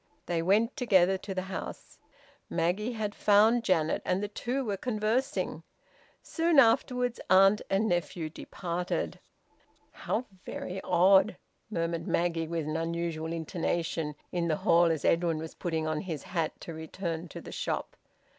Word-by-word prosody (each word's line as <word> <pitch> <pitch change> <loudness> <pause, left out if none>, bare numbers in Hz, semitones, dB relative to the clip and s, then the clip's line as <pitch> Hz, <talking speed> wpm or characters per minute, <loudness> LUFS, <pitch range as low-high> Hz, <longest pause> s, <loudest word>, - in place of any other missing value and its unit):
They 170 -1 0
went 210 +8 +2
together 190 -6 +4
to 195 0 -6
the 185 - -1
house. 190 0 -7 0.5
Maggie 180 +8 0
had 215 -2 -3
found 215 +4 +4
Janet, 160 -7 +1
and 185 +2 0
the - - -1
two 250 +6 -3
were 205 -3 -1
conversing. 240 +6 -1 0.6
Soon 330 -1 +1
afterwards 245 0 +4
aunt 195 +2 +6
and 195 +3 +2
nephew 175 -2 -1
departed. 175 +2 -4 0.7
"How 250 - -2 0.2
very 190 +1 -5
odd!" 185 +2 +4 0.3
murmured 170 -4 -2
Maggie, 170 -1 0
with 165 -2 -2
an 155 +1 -2
unusual 165 -1 -2
intonation, 165 -1 -2 0.2
in 175 -1 -1
the 160 - +2
hall, 170 +3 +4
as 165 -3 0
Edwin 165 -1 +2
was 160 +1 -6
putting 160 -2 -2
on 155 -1 -1
his 165 -7 -5
hat 165 -4 -2
to 165 - -7
return 165 +1 -5
to - - -8
the - - -10
shop. - - -3
175 Hz, 145 wpm, -29 LUFS, 165-210 Hz, 0.7 s, aunt